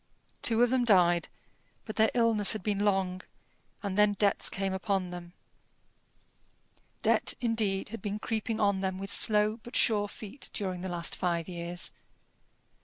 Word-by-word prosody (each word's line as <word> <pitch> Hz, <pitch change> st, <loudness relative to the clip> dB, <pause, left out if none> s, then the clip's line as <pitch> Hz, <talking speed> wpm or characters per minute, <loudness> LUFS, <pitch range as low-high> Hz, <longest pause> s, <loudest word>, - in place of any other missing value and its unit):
Two 230 Hz, 0 st, +3 dB
of 245 Hz, -, +2 dB
them 260 Hz, -1 st, +2 dB
died, 175 Hz, -6 st, +4 dB, 0.6 s
but 215 Hz, -, -7 dB
their 220 Hz, 0 st, +4 dB
illness 230 Hz, -4 st, +3 dB
had 215 Hz, -, -6 dB
been 205 Hz, -2 st, -1 dB
long; 190 Hz, -3 st, 0 dB, 0.6 s
and 200 Hz, -2 st, -3 dB
then 210 Hz, 0 st, +5 dB
debts 200 Hz, 0 st, +2 dB
came 195 Hz, -1 st, -2 dB
upon 190 Hz, -1 st, -1 dB
them. 175 Hz, 0 st, -9 dB, 1.7 s
Debt, -, -, +2 dB
indeed, 215 Hz, -5 st, 0 dB
had 230 Hz, -1 st, -7 dB
been 205 Hz, +1 st, -3 dB
creeping 220 Hz, 0 st, -3 dB
on 200 Hz, -2 st, +2 dB
them 190 Hz, -1 st, -2 dB
with 195 Hz, +1 st, -3 dB
slow 215 Hz, 0 st, +4 dB
but 240 Hz, -, -11 dB
sure 210 Hz, -3 st, +2 dB
feet 215 Hz, +6 st, -7 dB
during 185 Hz, -4 st, -3 dB
the 190 Hz, -, -4 dB
last 170 Hz, -1 st, -2 dB
five 170 Hz, -2 st, -1 dB
years. 175 Hz, -1 st, -2 dB
200 Hz, 155 wpm, -29 LUFS, 185-215 Hz, 1.7 s, then